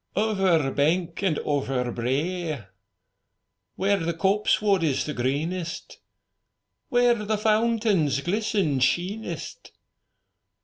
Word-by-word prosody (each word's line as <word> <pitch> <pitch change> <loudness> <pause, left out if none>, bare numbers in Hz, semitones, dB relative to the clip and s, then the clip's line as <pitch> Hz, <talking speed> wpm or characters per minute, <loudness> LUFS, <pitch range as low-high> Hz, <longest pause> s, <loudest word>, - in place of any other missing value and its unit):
Over 190 -9 +2
bank 165 +5 0
and 185 -7 +1
over 135 -4 -1
brae! 145 - -2 1.1
Where 200 +2 +1
the 165 0 -2
copsewood 200 +2 +2
is 150 -5 0
the 150 - -3
greenest. 160 +8 -3 0.9
Where 245 -2 +4
the 215 +1 0
fountains 215 - +2
glisten 190 -5 0
sheenest. 180 - -2
175 Hz, 90 wpm, -25 LUFS, 145-210 Hz, 1.1 s, Where